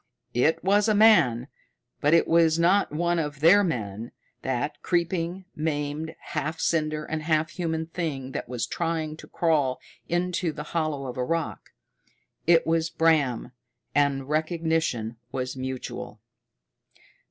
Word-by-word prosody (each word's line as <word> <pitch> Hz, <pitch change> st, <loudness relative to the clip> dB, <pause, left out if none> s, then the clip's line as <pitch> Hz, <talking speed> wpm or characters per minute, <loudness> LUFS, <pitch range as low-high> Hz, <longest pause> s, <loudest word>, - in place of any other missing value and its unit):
It 135 Hz, +7 st, +2 dB
was 205 Hz, +3 st, +3 dB
a 215 Hz, -, +3 dB
man, 170 Hz, -, +5 dB, 0.5 s
but 145 Hz, +3 st, +4 dB
it 165 Hz, -, +3 dB
was 165 Hz, -1 st, +4 dB
not 180 Hz, +4 st, +3 dB
one 170 Hz, +3 st, 0 dB
of 150 Hz, -3 st, -3 dB
their 180 Hz, +7 st, +6 dB
men, 115 Hz, -, -3 dB, 0.3 s
that 130 Hz, +3 st, -2 dB
creeping, 175 Hz, +1 st, -1 dB
maimed, 150 Hz, +1 st, -2 dB
half 160 Hz, +2 st, -3 dB
cinder 155 Hz, -2 st, 0 dB
and 155 Hz, 0 st, -3 dB
half 155 Hz, 0 st, +1 dB
human 160 Hz, -2 st, -2 dB
thing 155 Hz, -6 st, -4 dB
that -, -, -5 dB
was 125 Hz, -2 st, -2 dB
trying 165 Hz, -2 st, -2 dB
to -, -, -12 dB
crawl 150 Hz, -6 st, +1 dB, 0.3 s
into 175 Hz, 0 st, 0 dB
the 150 Hz, 0 st, -6 dB
hollow 155 Hz, -4 st, -1 dB
of 125 Hz, 0 st, -6 dB
a 125 Hz, -, 0 dB
rock. 165 Hz, +4 st, -3 dB, 0.8 s
It 165 Hz, -1 st, +5 dB
was 165 Hz, 0 st, +1 dB
Bram, 155 Hz, -9 st, +2 dB, 0.4 s
and 140 Hz, -2 st, +1 dB
recognition 155 Hz, -7 st, -1 dB
was 130 Hz, -1 st, -3 dB
mutual. 130 Hz, 0 st, -6 dB
160 Hz, 135 wpm, -26 LUFS, 135-170 Hz, 0.8 s, their